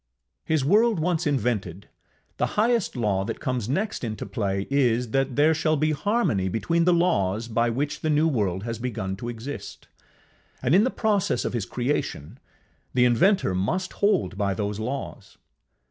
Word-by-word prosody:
His 155 -4 +1
world 215 +4 +4
once 170 0 0
invented, 105 - -1 0.5
the - - -2
highest 230 -4 +2
law 105 -5 0
that 115 +3 -5
comes 125 -4 -2
next 195 +7 -2
into 110 -2 -4
play 100 -4 -2
is, 125 -4 +2
that 135 0 0
there 150 +3 +4
shall 155 0 +1
be 155 +2 +1
harmony 155 - 0
between 165 - 0
the 180 - +5
laws 115 - +1
by 115 +1 +1
which 140 +5 -2
the 155 - -1
new 155 +1 +3
world 100 - -1
has 115 -1 -4
begun 105 -6 -3
to 120 - -5
exist; 120 +5 -7 0.7
and - - +1
in 200 +5 +6
the - - +2
process 210 - 0
of - - -2
his 115 -6 -2
creation, 120 - -3 0.6
the 125 -1 +5
inventor 125 - +3
must 160 - -1
hold 105 - +1
by 100 -2 0
those 105 0 -3
laws. 125 -2 -6
125 Hz, 165 wpm, -25 LUFS, 105-165 Hz, 0.7 s, in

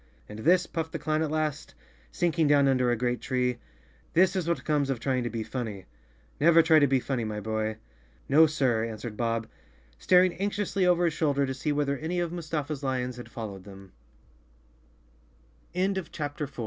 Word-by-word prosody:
"And 105 +1 -9
this," 180 +8 +3
puffed 160 -1 -4
the - - -1
clown 155 +1 -1
at 160 - 0
last, 155 -1 -2 0.4
sinking 165 -2 +1
down 145 -1 +4
under 130 -2 +2
a 120 - +2
great 120 0 -1
tree, 125 -1 -1 0.5
"this 185 +2 +4
is 180 -3 -1
what 170 - -1
comes 145 -3 +1
of 135 -3 -1
trying 130 0 0
to - - -1
be 115 0 -4
funny. 110 -6 -5 0.5
Never 165 +2 +6
try 160 -1 +6
to 145 - +4
be 135 0 +2
funny, 130 -2 -2
my 105 -1 -3
boy." 110 0 -2 0.5
"No, 155 +4 +6
sir," 130 -7 +1
answered 110 0 -5
Bob, 115 0 -1 0.5
staring 180 - +4
anxiously 200 -1 -1
over 175 0 +3
his 165 - +1
shoulder 140 -3 +1
to 130 - -3
see 140 +3 -2
whether 140 -2 0
any 170 +3 -2
of 170 -1 -1
Mus 170 -3 -7
145 Hz, 160 wpm, -27 LUFS, 120-165 Hz, 0.5 s, Never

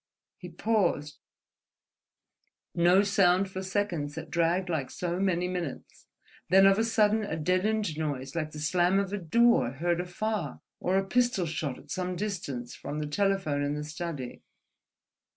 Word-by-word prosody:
He 180 - -8
paused: 170 -6 0 1.5
no 175 +3 +5
sound 195 -1 +3
for 190 - -4
seconds 185 -7 -2
that 160 -1 -7
dragged 170 +2 +1
like 155 -7 -2
so 175 0 -3
many 180 -2 +1
minutes, 180 -6 -6 0.4
then 190 +2 +7
of 195 +1 +5
a - - +3
sudden 220 -1 +2
a 160 -6 -3
deadened 185 +2 0
noise 135 -4 -3
like 155 -2 -1
the 155 - -10
slam 175 +4 +2
of 200 0 -1
a 205 - -1
door 180 - +3
heard 170 +5 0
afar—or 190 0 -3
a 195 - +1
pistol 240 -3 +1
shot 155 -4 -3
at - - -14
some 185 -1 -2
distance 170 - -4
from 150 - -6
the 150 - -2
telephone 190 -2 0
in 145 +1 -1
the 150 - -4
study. 150 -4 -6
180 Hz, 150 wpm, -29 LUFS, 155-195 Hz, 1.5 s, then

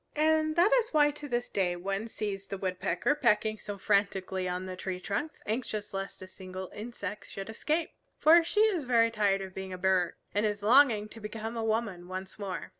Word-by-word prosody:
And 310 0 +2
that 355 +7 +5
is 485 -2 +3
why 295 -1 +4
to 295 0 -8
this 240 -2 -1
day 180 -3 0
one 195 +4 -3
sees 200 -3 -4
the 195 - -4
Woodpecker 185 +5 0
pecking 220 -6 +2
so 205 -1 -6
frantically 195 -2 0
on 180 +1 -3
the 185 0 -5
tree 180 0 -4
trunks, 285 +12 -4
anxious 215 -2 -3
lest 195 -1 -5
a - - -9
single 185 0 -8
insect 210 -2 -6
should 195 +2 -6
escape. 310 +8 -1 0.3
For 330 +2 +7
she 415 +6 +1
is 390 -9 +2
very 230 -2 +4
tired 205 -3 +2
of 190 -1 -7
being 190 -1 -6
a - - -5
bird, 180 -2 +2 0.2
and 205 - +1
is 205 -1 -1
longing 230 -2 +5
to 225 - -11
become 220 +2 -5
a 225 - -2
woman 215 -5 -1
once 185 +2 -7
more. 195 -3 -4
210 Hz, 200 wpm, -30 LUFS, 190-245 Hz, 0.3 s, For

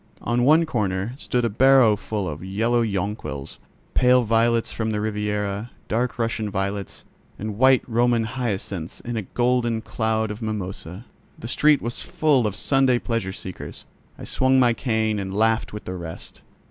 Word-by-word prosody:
On 120 +1 +1
one 155 +5 +5
corner 105 -5 -1
stood 125 -1 0
a - - +3
barrow 125 0 +5
full 105 -1 -4
of 75 +1 -6
yellow 115 +5 +1
jonquils, 100 - -4 0.3
pale 125 0 +5
violets 115 +1 +2
from 110 -1 -2
the 105 -1 -1
Riviera, 105 0 -2 0.2
dark 120 +3 -1
Russian 115 -2 -1
violets, 100 0 -4 0.3
and 105 0 -5
white 130 0 +5
Roman 120 0 +2
hyacinths 105 -8 -4
in 120 0 -5
a 110 - -1
golden 120 +2 0
cloud 110 -1 -1
of 105 +3 -7
mimosa. 100 -2 -5 0.3
The 115 - -7
street 150 +4 +3
was 120 +1 -4
full 140 -7 +2
of 105 - -4
Sunday 130 +2 +3
pleasure 115 -6 -2
seekers. 95 -1 -8 0.3
I - - -10
swung 130 0 +2
my 120 -2 +4
cane 110 -3 0
and 95 0 -4
laughed 110 +1 +2
with 105 - -8
the 90 - -4
rest. 85 -3 -8
110 Hz, 160 wpm, -23 LUFS, 100-120 Hz, 0.3 s, one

